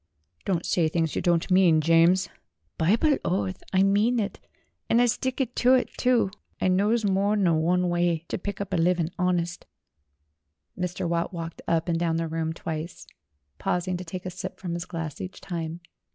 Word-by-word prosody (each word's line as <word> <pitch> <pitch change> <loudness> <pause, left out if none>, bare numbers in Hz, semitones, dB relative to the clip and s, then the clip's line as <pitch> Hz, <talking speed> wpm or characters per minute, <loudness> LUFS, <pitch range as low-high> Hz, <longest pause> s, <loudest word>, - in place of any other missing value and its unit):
"Don't 180 -3 0
say 170 -3 +2
things 160 -1 -1
you - - 0
don't 170 +1 +1
mean, 180 -4 +5
James." 165 +4 +4 0.3
' 80 0 -48
"Bible 235 - +3
oath, 185 +1 -1
I 190 0 +4
mean 210 +5 +3
it, 210 -1 -3 0.5
and 230 - +4
'ud 245 -1 +4
stick 260 +1 -1
ter 255 +1 +5
it, - - -3
too! 245 -6 +2 0.3
I 185 - +2
knows 210 +5 +2
more 200 +1 +2
nor 175 -6 +2
one 180 +3 +2
way 175 -1 0
ter - - -3
pick 200 +1 -5
up 200 -1 -4
a - - +2
living 170 0 +1
honist." 175 -1 -1 1.1
Mr. 180 -1 -3
Watt 170 +2 -1
walked 165 -1 -6
up 165 0 +1
and 165 -1 0
down 165 -1 +1
the 165 0 -1
room 160 0 -2
twice, 160 0 -6 0.5
paus 180 +1 -1
ing 185 - -1
to 180 - -6
take 180 +1 -7
a 185 - -3
sip 185 +2 -7
from 175 -3 -4
his 170 0 -4
glass 165 -4 -5
each 185 +1 -7
time. 170 -1 -5
180 Hz, 190 wpm, -26 LUFS, 165-195 Hz, 1.1 s, mean